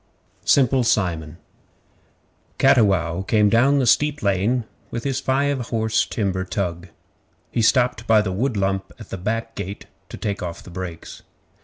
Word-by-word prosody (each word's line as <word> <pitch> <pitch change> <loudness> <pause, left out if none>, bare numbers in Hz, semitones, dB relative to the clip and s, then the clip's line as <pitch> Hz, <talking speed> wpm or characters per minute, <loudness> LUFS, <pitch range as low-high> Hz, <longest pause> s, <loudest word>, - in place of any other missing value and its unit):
Simple 130 -1 +4
Simon 85 -8 0 1.2
Cattiwow 95 -10 +3
came 105 +1 +3
down 130 +7 +4
the 135 - +2
steep 150 +4 +2
lane 100 +5 +1 0.3
with 115 - -5
his 135 -2 -1
five 135 -2 0
horse 110 -1 0
timber 95 -4 -1
tug. 90 -2 -3 0.6
He 120 - 0
stopped 120 0 +2
by 110 -2 +5
the 95 - -2
wood 115 +4 -1
lump 95 0 -1
at 110 - -12
the - - -4
back 115 +4 -3
gate 100 -1 -6 0.2
to - - -8
take 100 -1 -3
off 85 -2 -6
the 90 - -12
brakes. 85 -2 -7
110 Hz, 150 wpm, -22 LUFS, 95-125 Hz, 1.2 s, by